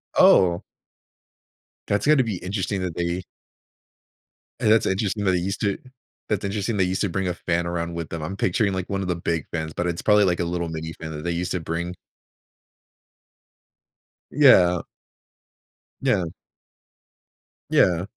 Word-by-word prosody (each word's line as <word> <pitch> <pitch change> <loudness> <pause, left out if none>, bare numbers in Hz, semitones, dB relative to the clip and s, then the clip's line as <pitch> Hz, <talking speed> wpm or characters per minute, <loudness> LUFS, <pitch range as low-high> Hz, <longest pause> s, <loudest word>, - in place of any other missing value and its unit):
Oh 90 -2 +5 1.3
That's 100 - +1
gonna 150 -4 +5
be 105 -6 -3
interesting 95 +1 -3
that 90 -3 -3
they 85 +1 -2 1.4
And 110 -3 +3
that's 110 - +4
interesting 100 +1 -1
that 95 - +4
they 90 - +2
used 95 +3 -3
to 100 -2 0 0.5
that's 105 -2 -1
interesting 105 +2 -2
they 95 - +3
used 90 +1 -1
to 100 - +1
bring 95 +2 -1
a 90 - 0
fan 85 0 -1
around 85 0 -3
with 85 -2 -4
them, 80 -2 -5
I'm 95 +5 -5
picturing, 100 +2 +1
like, 95 -1 -4
one 100 0 -1
of 90 - -3
the 90 - +1
big 85 -1 -2
fans, 80 -2 -3
but 90 - -2
it's 85 0 -2
probably, 105 -1 +5
like, 90 -2 +1
a 85 - 0
little 85 -1 -2
mini 80 0 -5
fan 80 -1 -8
that 75 0 -6
they 85 - 0
used 85 +1 -2
to 90 - -1
bring. 85 +2 -3 2.4
Yeah. 90 - +5 1.2
Yeah. 90 - +2 1.5
Yeah. 90 0 +3
90 Hz, 160 wpm, -24 LUFS, 85-100 Hz, 2.4 s, Oh